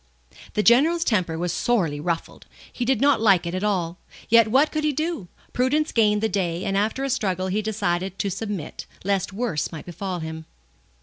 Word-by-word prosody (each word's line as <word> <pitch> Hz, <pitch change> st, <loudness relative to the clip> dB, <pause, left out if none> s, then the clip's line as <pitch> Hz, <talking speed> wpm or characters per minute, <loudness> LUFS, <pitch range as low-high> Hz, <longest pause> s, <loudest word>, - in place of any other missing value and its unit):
The 210 Hz, -, +2 dB
General's 310 Hz, +10 st, +5 dB
temper 180 Hz, -, 0 dB
was 175 Hz, 0 st, -2 dB
sorely 175 Hz, -12 st, 0 dB
ruffled. 165 Hz, +2 st, -4 dB, 0.3 s
He 245 Hz, -, -2 dB
did 265 Hz, +1 st, +1 dB
not 285 Hz, -4 st, +4 dB
like 195 Hz, -6 st, +4 dB
it 170 Hz, -, -3 dB
at 185 Hz, +2 st, -2 dB
all; 180 Hz, -4 st, -1 dB, 0.3 s
yet 230 Hz, -1 st, +6 dB
what 270 Hz, +7 st, +3 dB
could 310 Hz, -1 st, -2 dB
he 305 Hz, -, +2 dB
do? 310 Hz, -, -3 dB, 0.3 s
Prudence 290 Hz, +5 st, +1 dB
gained 210 Hz, -2 st, +2 dB
the -, -, +4 dB
day, 180 Hz, -4 st, -2 dB
and 195 Hz, -, -1 dB
after 215 Hz, +6 st, 0 dB
a -, -, 0 dB
struggle 190 Hz, -6 st, -1 dB
he 205 Hz, +3 st, 0 dB
decided 195 Hz, -3 st, -2 dB
to 200 Hz, -, -1 dB
submit, 205 Hz, -5 st, -5 dB, 0.2 s
lest 195 Hz, 0 st, 0 dB
worse 200 Hz, -8 st, -2 dB
might 160 Hz, -3 st, -8 dB
befall 180 Hz, +2 st, -4 dB
him. 160 Hz, -1 st, -6 dB
200 Hz, 190 wpm, -24 LUFS, 175-240 Hz, 0.3 s, yet